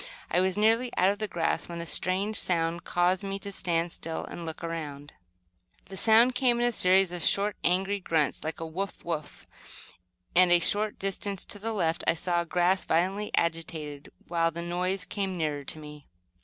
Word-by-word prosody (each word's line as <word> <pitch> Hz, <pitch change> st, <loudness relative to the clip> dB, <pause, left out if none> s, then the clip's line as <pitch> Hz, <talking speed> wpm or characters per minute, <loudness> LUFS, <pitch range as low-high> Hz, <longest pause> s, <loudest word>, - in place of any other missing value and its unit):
I 180 Hz, -, +3 dB
was 190 Hz, +1 st, 0 dB
nearly 225 Hz, +4 st, +3 dB
out 185 Hz, +2 st, +4 dB
of 205 Hz, -, -5 dB
the 215 Hz, -, -2 dB
grass, 170 Hz, -3 st, -1 dB
when 170 Hz, -1 st, -5 dB
a 170 Hz, -, -4 dB
strange 190 Hz, +5 st, +1 dB
sound 170 Hz, -2 st, +1 dB
caused 175 Hz, +2 st, +1 dB
me 195 Hz, 0 st, -3 dB
to 200 Hz, 0 st, -7 dB
stand 170 Hz, -3 st, -1 dB
still 165 Hz, -1 st, -4 dB
and 170 Hz, -1 st, -7 dB
look 160 Hz, +1 st, -6 dB
about 160 Hz, -4 st, -4 dB
me. 145 Hz, -, -15 dB, 0.8 s
The 195 Hz, -, -7 dB
sound 230 Hz, +5 st, +5 dB
came 245 Hz, -1 st, +2 dB
in 240 Hz, -, +2 dB
a 240 Hz, -, +2 dB
series 190 Hz, -3 st, +4 dB
of 175 Hz, -2 st, -4 dB
short, 205 Hz, +1 st, +3 dB
angry 190 Hz, +3 st, +1 dB
grunts, 160 Hz, -7 st, 0 dB
like 160 Hz, 0 st, -4 dB
"woof! 165 Hz, +5 st, -5 dB
woof!" 155 Hz, -4 st, -5 dB, 0.9 s
and, 180 Hz, 0 st, +6 dB
a 175 Hz, -, +7 dB
short 205 Hz, +5 st, +1 dB
distance 195 Hz, 0 st, -3 dB
to 205 Hz, -, -7 dB
the 225 Hz, +3 st, -3 dB
left 170 Hz, -6 st, 0 dB
I -, -, +4 dB
saw 175 Hz, +1 st, 0 dB
the 170 Hz, -, -18 dB
grass 180 Hz, +1 st, +2 dB
violently 190 Hz, +5 st, 0 dB
agitated, 160 Hz, -3 st, -3 dB, 0.2 s
while 165 Hz, -1 st, +1 dB
the 170 Hz, +1 st, -6 dB
noise 180 Hz, +2 st, 0 dB
came 195 Hz, -3 st, -3 dB
nearer 150 Hz, -3 st, -2 dB
to -, -, -4 dB
me. 150 Hz, -1 st, -11 dB
180 Hz, 195 wpm, -28 LUFS, 165-195 Hz, 0.9 s, a